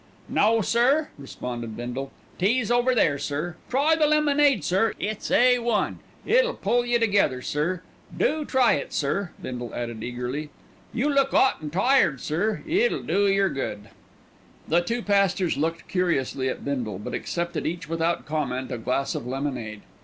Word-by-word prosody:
"No, 225 +1 +3
sir," 255 +9 +2
responded 120 -5 -6
Bindle, 125 +3 -5 0.3
"tea's 225 +5 +1
over 245 +1 +3
there, 145 -10 +2
sir. 155 +5 -3
Try 285 +5 +3
the 310 -1 +3
lemonade, 295 - +3
sir; 195 +7 +1
it's 215 0 -3
A 250 0 +5
1. 235 -3 0 0.3
It'll - - +3
pull 245 0 +1
yer 240 0 +2
together, 200 - +2
sir. 170 +5 -1 0.3
Do 300 - +1
try 260 -4 +3
it, 140 - -3
sir," 175 +6 -1
Bindle 120 -2 -6
added 120 -2 -4
eagerly. 125 +5 -4 0.4
"You 250 +4 0
look 275 -2 +2
'ot 265 - +3
and 150 -1 -5
tired, 185 - +3
sir. 195 +8 -1
It'll 395 +9 +1
do 200 0 +2
yer 195 0 +3
good." 105 -6 -5 0.8
The 170 +2 +3
two 230 +7 -2
pastors 195 -3 +2
looked 165 +3 -2
curiously 140 -8 0
at - - -5
Bindle, 125 -8 -2
but 105 - -7
accepted 170 0 -3
each 170 0 -4
without 165 +1 -1
comment 135 -4 -2
a 120 - -3
glass 130 +4 -1
of 120 - -5
lemonade. 125 -6 -4
175 Hz, 160 wpm, -25 LUFS, -, 0.8 s, A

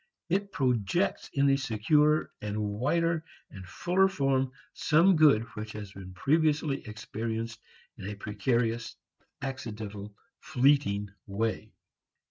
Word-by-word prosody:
It 200 +3 0
projects 130 - 0
in 140 0 +3
securer 150 +6 +2
and 105 0 -3
wider 155 +11 0 0.3
and 95 - -9
fuller 180 - +2
form 135 -7 +1 0.2
some 170 +5 +4
good 150 -8 +5
which 110 0 -6
has 105 -2 -7
been 95 -2 -10
previously 150 - +1
experienced 110 +1 -4 0.4
in 95 - -6
a 105 - -5
precarious, 115 +3 -1 0.5
accidental, 105 -6 -6 0.2
fleeting 125 -7 +2 0.2
way. 110 +2 -2
115 Hz, 105 wpm, -29 LUFS, 105-150 Hz, 0.5 s, good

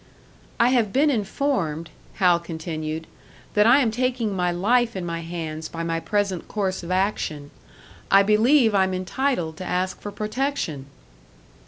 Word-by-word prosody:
"I 235 - +5
have 235 -6 +2
been 290 +5 +3
informed," 195 - -1 0.2
Hal 180 -3 +4
continued, 160 -1 -5 0.5
"that 210 +1 +4
I 260 +5 +6
am 230 -4 +1
taking 245 -3 -1
my 180 -1 +1
life 235 +6 +2
in 185 -2 -3
my 170 -1 -3
hands 160 -2 -5
by 165 0 -5
my 165 0 -1
present 200 -1 -1
course 190 -3 -2
of 170 - -8
action. 185 -6 -1 0.6
I 195 0 +6
believe 225 +3 +4
I'm 190 -1 +2
entitled 185 - -1
to - - -6
ask 185 +1 -2
for 205 - -6
protection." 215 - -3
190 Hz, 150 wpm, -24 LUFS, 165-230 Hz, 0.6 s, I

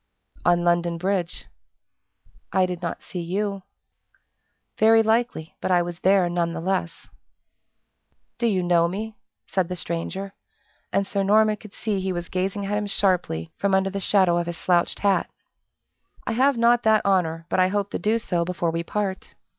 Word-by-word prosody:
"On 175 0 +3
London 175 0 +1
Bridge." 180 -1 -2 1.1
"I 190 -1 +3
did 180 -1 -5
not 170 -1 -4
see 180 - -6
you." 195 +3 -2 1.2
"Very 225 +1 +6
likely, 220 -7 0
but - - -2
I 175 -1 +4
was 175 0 -6
there 190 -1 +4
none 170 -1 -1
the - - -4
less." 180 -1 -2 1.3
"Do 235 - +2
you 190 -5 +1
know 170 -1 +3
me?" 215 +5 -5 0.3
said 190 -3 0
the 180 - -3
stranger; 185 +3 -4 0.6
and 200 - +1
Sir 200 0 -2
Norman 215 +2 +3
could 210 -1 -14
see 210 -4 -2
he 190 0 -2
was 175 -1 -5
gazing 190 +2 -2
at 205 +1 -1
him 210 0 -1
sharply 180 - 0
from 200 -1 +1
under 190 0 +1
the 200 - -3
shadow 185 -3 +3
of 170 - -3
his 170 -1 -4
slouched 175 -1 +1
hat. 200 -1 +2 1.0
"I - - -1
have 260 +3 +3
not 235 +1 +4
that 220 -1 +3
honor, 165 -4 +1
but - - 0
I 185 - +5
hope 200 +1 -2
to - - -3
do 220 +2 +1
so 175 -6 -1
before 170 -1 -1
we 165 +1 -2
part." 195 +2 -4
190 Hz, 175 wpm, -24 LUFS, 175-205 Hz, 1.3 s, Very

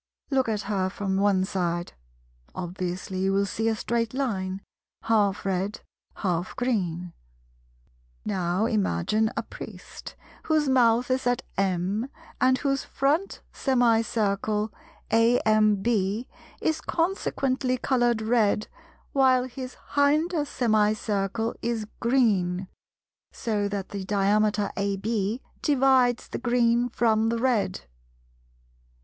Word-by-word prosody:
Look 265 -3 +2
at 210 -2 -1
her 195 -2 -1
from 190 0 -2
one 195 -2 +3
side. 175 -3 -2 0.6
Obviously 185 +1 -4
you 190 +1 +1
will 200 +1 +2
see 225 +3 -2
a 225 - +2
straight 230 +1 -1
line, 195 -8 -2 0.4
half 205 -3 +1
red, 195 +2 -1 0.3
half 180 -2 -2
green. 180 -9 -1 1.1
Now 185 0 0
imagine 215 - +1
a - - 0
Priest, - - -10 0.3
whose 310 -2 +2
mouth 245 -1 +3
is 255 -1 0
at 245 +1 +1
M, 195 +5 0 0.3
and 255 0 +4
whose 275 0 -1
front 300 +8 -1
semicircle 220 -4 +1 0.4
(AMB) 215 -3 +3 0.7
is 315 0 0
consequently 275 -7 0
coloured 240 -3 +1
red, 215 -2 +2 0.4
while 260 -2 +4
his 255 0 -7 0.2
hinder 300 +3 +2
semicircle 215 -2 0
is 230 -2 -2
green; 195 -7 +2 0.6
so 210 -3 -1
that 200 -1 -4
the 200 -1 -5
diameter 205 +1 +1
AB 200 +3 -1 0.2
divides 260 -4 +3
the - - -5
green 240 0 +2
from 225 -2 +2
the 230 - 0
red. 235 - 0
220 Hz, 105 wpm, -26 LUFS, 195-250 Hz, 1.1 s, and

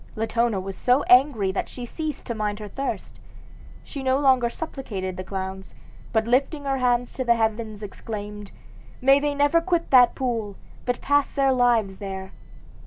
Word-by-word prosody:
Latona 225 -1 0
was 190 +1 -6
so 250 +3 +2
angry 245 -7 +4
that 190 - -3
she 245 - -7
ceased 310 +4 -5
to 235 - -3
mind 210 -2 -2
her 210 -1 -7
thirst. 275 +7 -5 0.6
She 280 - -7
no 260 0 +2
longer 260 -4 +3
supplicated 220 - -5
the 185 - -5
clowns, 190 0 -6 0.4
but 220 -2 +1
lifting 275 +5 +1
her 270 -1 0
hands 245 -1 +1
to 245 -2 +2
heaven 220 -1 -1
exclaimed, 210 0 -7 0.5
'May 270 +2 +5
they 290 0 -1
never 290 +4 +3
quit 340 -1 -1
that 250 -2 +6
pool, 230 -6 -2 0.3
but 245 0 -1
pass 285 0 +1
their 275 -1 +3
lives 235 -6 +2
there!' 190 -1 -6
240 Hz, 165 wpm, -24 LUFS, 210-270 Hz, 0.6 s, that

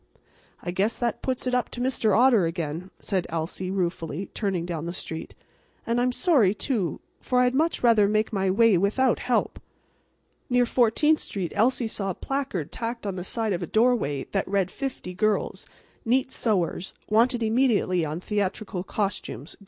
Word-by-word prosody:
"I 175 - -3
guess 200 +5 0
that 240 -2 -2
puts 260 -1 -2
it 250 - -1
up 250 -1 +1
to - - -8
Mr. 240 -5 +2
Otter 235 -7 +5
again," 165 +1 -4
said 190 -4 -2
Elsie, 165 +3 -3
ruefully, 180 -1 -3
turning 190 -5 -1
down 170 -2 -4
the 170 - -4
street. 160 -2 -6 0.5
"And 235 +1 +1
I'm 250 +1 +2
sorry, 245 - +3
too, 205 - -2 0.2
for 250 -1 +1
I'd 250 0 +3
much 315 +2 +1
rather 225 -4 +5
make 215 +1 0
my 195 -1 +1
way 210 -1 +4
without 230 +6 +2
help." 250 - 0 0.9
Near 245 -1 +4
Fourteenth 255 +6 +3
street 180 -6 -3
Elsie 240 +3 +2
saw 205 -3 -3
a 185 - -3
placard 270 - -3
tacked 230 -1 -4
on 195 -2 -2
the 180 - -4
side 220 +2 -1
of 180 - -3
a 175 - -3
doorway 220 - +2
that 195 - -1
read: 195 -2 0
"Fifty 265 -9 -5
girls, 215 +3 -1 0.4
neat 255 +2 +1
sewers, 190 -4 0
wanted 235 +2 +3
immediately 220 -6 +2
on 155 +1 -3
theatrical 200 -2 -2
costumes. 195 - -4
210 Hz, 170 wpm, -26 LUFS, 185-245 Hz, 0.9 s, Otter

